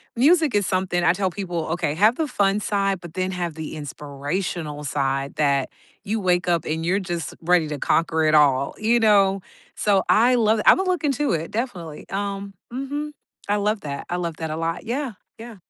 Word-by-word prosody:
music 310 Hz, +3 st, +4 dB
is 205 Hz, -2 st, +2 dB
something 185 Hz, -2 st, 0 dB
I 170 Hz, -, +5 dB
tell 190 Hz, 0 st, -1 dB
people 175 Hz, -3 st, -3 dB
okay, 165 Hz, -3 st, -1 dB
have 215 Hz, +7 st, +4 dB
the 320 Hz, -, -1 dB
fun 200 Hz, -5 st, +1 dB
side, 195 Hz, -2 st, 0 dB
but 170 Hz, -2 st, -10 dB
then 185 Hz, 0 st, -1 dB
have 175 Hz, -3 st, -3 dB
the 160 Hz, 0 st, -6 dB
inspirational 150 Hz, +2 st, -4 dB
side 135 Hz, 0 st, -1 dB
that 140 Hz, -3 st, +1 dB, 0.3 s
you 220 Hz, +2 st, -1 dB
wake 180 Hz, -2 st, +1 dB
up 170 Hz, -2 st, +1 dB
and 160 Hz, +1 st, -2 dB
you're 185 Hz, +3 st, +2 dB
just 175 Hz, -5 st, -4 dB
ready 170 Hz, -1 st, +3 dB
to 150 Hz, -2 st, -4 dB
conquer 160 Hz, -1 st, +1 dB
it 155 Hz, 0 st, +4 dB
all, 140 Hz, -2 st, +3 dB
you 230 Hz, +2 st, +2 dB
know? 200 Hz, -3 st, +4 dB, 0.3 s
So, 200 Hz, -2 st, +2 dB
I 245 Hz, +3 st, +5 dB
love 220 Hz, -2 st, +3 dB
it -, -, -3 dB
I -, -, +9 dB
would 380 Hz, 0 st, -2 dB
look 360 Hz, -3 st, 0 dB
into 290 Hz, 0 st, +1 dB
it, 165 Hz, 0 st, -2 dB
definitely, 185 Hz, -, -4 dB
um, 200 Hz, 0 st, -4 dB, 0.2 s
mhm, 285 Hz, +4 st, -4 dB, 0.4 s
I 205 Hz, -, +3 dB
love 210 Hz, +1 st, 0 dB
that 140 Hz, -1 st, -5 dB
I 175 Hz, -, 0 dB
love 170 Hz, -3 st, -3 dB
that 160 Hz, -1 st, -4 dB
a -, -, -2 dB
lot, 165 Hz, +4 st, -3 dB
yeah, 255 Hz, +1 st, -2 dB, 0.3 s
yeah. 230 Hz, 0 st, -9 dB
185 Hz, 205 wpm, -23 LUFS, 160-215 Hz, 0.4 s, I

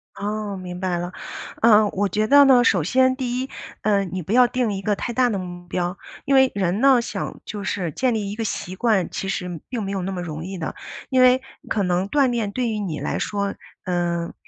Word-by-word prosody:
哦， 210 Hz, 0 st, -3 dB
明 180 Hz, -1 st, -7 dB
白 185 Hz, -2 st, -1 dB
了。 175 Hz, +1 st, -4 dB, 0.5 s
呃， 215 Hz, -2 st, +6 dB
我 200 Hz, 0 st, -1 dB
觉 215 Hz, +4 st, +1 dB
得 285 Hz, +1 st, +8 dB
呢， 255 Hz, -2 st, +6 dB
首 185 Hz, -8 st, +3 dB
先 260 Hz, +7 st, +3 dB
第 250 Hz, -2 st, -2 dB
一， 265 Hz, -, -5 dB, 0.3 s
呃， 200 Hz, -2 st, +3 dB
你 185 Hz, 0 st, -4 dB
不 180 Hz, -, -6 dB
要 250 Hz, 0 st, +6 dB
定 240 Hz, -4 st, -1 dB
一 195 Hz, -, -4 dB
个 205 Hz, +1 st, 0 dB
太 240 Hz, -, -4 dB
大 250 Hz, 0 st, +3 dB
的 205 Hz, -, -1 dB
目 175 Hz, -1 st, -8 dB
标。 180 Hz, +1 st, -2 dB, 0.3 s
因 275 Hz, -, +1 dB
为 265 Hz, -1 st, +5 dB
人 190 Hz, +3 st, 0 dB
呢， 270 Hz, -3 st, +6 dB
想 -, -, -5 dB
就 205 Hz, -1 st, -6 dB
是 185 Hz, -4 st, -2 dB
建 250 Hz, -, 0 dB
立 210 Hz, -3 st, -2 dB
一 -, -, -5 dB
个 225 Hz, -, -3 dB
习 185 Hz, -3 st, -4 dB
惯， 210 Hz, -3 st, +1 dB
其 195 Hz, -, -4 dB
实 180 Hz, -4 st, -4 dB
并 240 Hz, -4 st, -3 dB
没 195 Hz, -, -3 dB
有 195 Hz, -2 st, -2 dB
那 190 Hz, +2 st, -3 dB
么 180 Hz, -2 st, -4 dB
容 160 Hz, -2 st, -5 dB
易 190 Hz, +1 st, -6 dB
的。 160 Hz, -, -4 dB, 0.3 s
因 255 Hz, -1 st, +3 dB
为 255 Hz, +1 st, +6 dB, 0.3 s
可 205 Hz, -3 st, +1 dB
能 180 Hz, +2 st, 0 dB
锻 280 Hz, -3 st, +3 dB
炼 225 Hz, -4 st, -1 dB
对 245 Hz, +2 st, -1 dB
于 215 Hz, -1 st, -2 dB
你 175 Hz, -7 st, -3 dB
来 -, -, -2 dB
说， 200 Hz, -1 st, -2 dB, 0.3 s
嗯， 175 Hz, -2 st, -1 dB
200 Hz, 250 characters per minute, -22 LUFS, 180-240 Hz, 0.5 s, 得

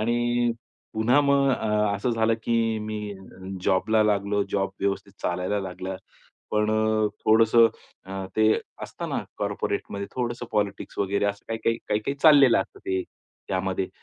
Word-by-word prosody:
आणि 120 Hz, +1 st, +1 dB, 0.4 s
पुन्हा 115 Hz, +6 st, +4 dB
मग 140 Hz, -1 st, +3 dB
अ, 105 Hz, -4 st, +1 dB
असं 110 Hz, +5 st, -1 dB
झालं 115 Hz, -1 st, +2 dB
की 115 Hz, -1 st, +1 dB
मी 105 Hz, -1 st, -5 dB, 0.5 s
जॉबला 105 Hz, +3 st, +3 dB
लागलो, 100 Hz, -1 st, +1 dB
जॉब 95 Hz, -1 st, 0 dB
व्यवस्थित 100 Hz, 0 st, -2 dB
चालायला 90 Hz, +3 st, -1 dB
लागला. 95 Hz, 0 st, -5 dB, 0.5 s
पण 105 Hz, 0 st, +1 dB
अ, 110 Hz, 0 st, +2 dB, 0.2 s
थोडंसं 115 Hz, +1 st, +6 dB, 0.4 s
अ, 95 Hz, 0 st, -5 dB
ते 110 Hz, 0 st, +5 dB, 0.3 s
असतं -, -, -6 dB
ना, -, -, -1 dB, 0.2 s
कॉर्पोरेटमध्ये 100 Hz, 0 st, -3 dB
थोडंसं 120 Hz, -1 st, -3 dB
पॉलिटिक्स 105 Hz, -2 st, -2 dB
वगैरे 100 Hz, +1 st, 0 dB
असं 100 Hz, 0 st, -3 dB
काही-काही, 115 Hz, 0 st, 0 dB
काही-काही 105 Hz, +6 st, 0 dB
चाललेलं 140 Hz, -6 st, +7 dB
असतं -, -, -7 dB
ते 95 Hz, -1 st, 0 dB, 0.5 s
त्यामध्ये. 95 Hz, 0 st, -1 dB
110 Hz, 135 wpm, -25 LUFS, 100-115 Hz, 0.5 s, चाललेलं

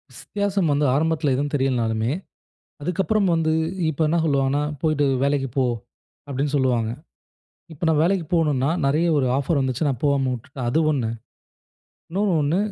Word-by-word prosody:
ஸ் -, -, -11 dB
வித்தியாசம் 200 Hz, -4 st, 0 dB
வந்து 145 Hz, +1 st, +2 dB
ஆரம்பத்தில 155 Hz, -1 st, +1 dB
எதுவும் 145 Hz, +2 st, -1 dB
தெரியலனாலுமே, 120 Hz, -4 st, 0 dB, 0.7 s
அதுக்கப்புறம் 195 Hz, +6 st, +1 dB
வந்து 165 Hz, -1 st, +1 dB, 0.4 s
இப்ப 160 Hz, 0 st, -3 dB
என்ன 165 Hz, +3 st, +1 dB
சொல்வாங்கன்னா, 140 Hz, -2 st, +1 dB, 0.2 s
"போய்ட்டு 155 Hz, -2 st, +2 dB, 0.2 s
வேலைக்கு 140 Hz, -1 st, +1 dB
போ." 130 Hz, -, +3 dB, 0.6 s
அப்டின்னு 140 Hz, +1 st, -2 dB
சொல்லுவாங்க. 125 Hz, -5 st, +1 dB, 0.8 s
இப்ப 160 Hz, +2 st, -6 dB
நான் 155 Hz, -2 st, +3 dB
வேலைக்கு 180 Hz, +1 st, +1 dB
போகணும்னா, 150 Hz, -5 st, +2 dB, 0.2 s
நிறைய 155 Hz, +5 st, +2 dB
ஒரு 135 Hz, -3 st, +2 dB
ஆஃபர் 140 Hz, +2 st, +1 dB
வந்துச்சு 130 Hz, +3 st, -1 dB
நான் 130 Hz, -4 st, -2 dB
போகாம 140 Hz, -2 st, +2 dB
விட்டுட்டேன், 125 Hz, +1 st, -6 dB
அது 155 Hz, -, +2 dB
ஒண்ணு. 125 Hz, -6 st, -1 dB, 1.0 s
இன்னொன்னு 195 Hz, +1 st, +1 dB
ஒண்ணு, 150 Hz, +5 st, +1 dB
145 Hz, 145 wpm, -23 LUFS, 135-165 Hz, 1.0 s, போ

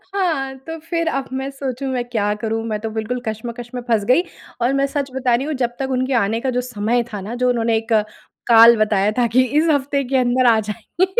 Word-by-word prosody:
हाँ, 290 Hz, -9 st, -1 dB
तो 325 Hz, 0 st, -5 dB
फिर 335 Hz, +1 st, -2 dB
अब 275 Hz, -4 st, -1 dB
मैं 270 Hz, -, -4 dB
सोचूँ 270 Hz, -1 st, -4 dB
मैं 245 Hz, -1 st, -1 dB
क्या 210 Hz, -3 st, 0 dB
करूँ? 225 Hz, 0 st, -2 dB
मैं 215 Hz, -1 st, -2 dB
तो 225 Hz, +1 st, -4 dB
बिल्कुल 230 Hz, +3 st, -2 dB
कश्मकश 235 Hz, +2 st, -5 dB
में 245 Hz, -, -3 dB
फँस 220 Hz, -3 st, +2 dB
गई। 255 Hz, +9 st, +4 dB, 0.4 s
और 250 Hz, +3 st, +2 dB
मैं 275 Hz, 0 st, +2 dB
सच 275 Hz, -1 st, -3 dB
बता 250 Hz, -2 st, +2 dB
रही 265 Hz, +4 st, -2 dB
हूँ 310 Hz, -, -2 dB
जब 240 Hz, 0 st, -2 dB
तक 265 Hz, 0 st, -2 dB
उनके 260 Hz, +1 st, -1 dB
आने 220 Hz, +3 st, -1 dB
का 260 Hz, -, -1 dB
जो 250 Hz, -, +2 dB
समय 235 Hz, 0 st, -1 dB
था 205 Hz, -, -4 dB
ना, 215 Hz, +5 st, -6 dB
जो 250 Hz, 0 st, +1 dB
उन्होंने 230 Hz, -2 st, +1 dB
एक 225 Hz, +1 st, -2 dB, 0.5 s
काल 230 Hz, 0 st, +8 dB
बताया 210 Hz, -1 st, +2 dB
था 240 Hz, -1 st, +3 dB
कि 255 Hz, +3 st, +3 dB, 0.2 s
इस 330 Hz, -, +2 dB
हफ़्ते 280 Hz, 0 st, 0 dB
के 265 Hz, +1 st, 0 dB
अंदर 250 Hz, 0 st, +2 dB
आ 220 Hz, -, +3 dB
जाएँ। 230 Hz, -, -1 dB
245 Hz, 235 wpm, -20 LUFS, 225-270 Hz, 0.5 s, काल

